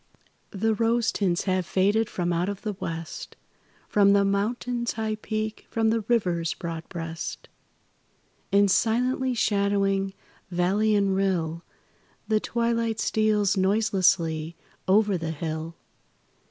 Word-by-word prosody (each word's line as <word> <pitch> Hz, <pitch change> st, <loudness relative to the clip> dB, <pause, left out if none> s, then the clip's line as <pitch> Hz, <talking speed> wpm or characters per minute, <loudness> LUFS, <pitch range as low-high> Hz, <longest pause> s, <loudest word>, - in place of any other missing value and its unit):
The 220 Hz, +3 st, 0 dB
rose 230 Hz, +1 st, +1 dB
tints 180 Hz, -4 st, 0 dB
have 185 Hz, -1 st, 0 dB
faded 205 Hz, +5 st, +1 dB
from 175 Hz, -1 st, -1 dB
out 175 Hz, +3 st, 0 dB
of 200 Hz, -1 st, -6 dB
the 215 Hz, -2 st, -2 dB
West, 165 Hz, -3 st, -6 dB, 0.5 s
From 200 Hz, -1 st, +4 dB
the 200 Hz, 0 st, +4 dB
Mountain's 235 Hz, +4 st, -1 dB
high 220 Hz, -1 st, -2 dB
peak, 215 Hz, 0 st, -4 dB
from 225 Hz, -1 st, +1 dB
the 225 Hz, 0 st, +1 dB
river's 175 Hz, -8 st, +1 dB
broad 165 Hz, -1 st, -6 dB
breast. 165 Hz, -1 st, -6 dB, 1.0 s
And, 200 Hz, 0 st, +4 dB
silently 250 Hz, +4 st, +1 dB
shadowing 200 Hz, -2 st, +1 dB, 0.3 s
valley 195 Hz, +5 st, +2 dB
and 200 Hz, -2 st, +2 dB
rill, 170 Hz, -4 st, 0 dB, 0.7 s
The 215 Hz, -1 st, +2 dB
twilight 230 Hz, -1 st, -1 dB
steals 215 Hz, -2 st, +2 dB
noiselessly 185 Hz, -5 st, +1 dB, 0.3 s
over 200 Hz, -1 st, +3 dB
the 165 Hz, -1 st, -3 dB
hill. 160 Hz, +1 st, -4 dB
200 Hz, 120 wpm, -26 LUFS, 175-220 Hz, 1.0 s, From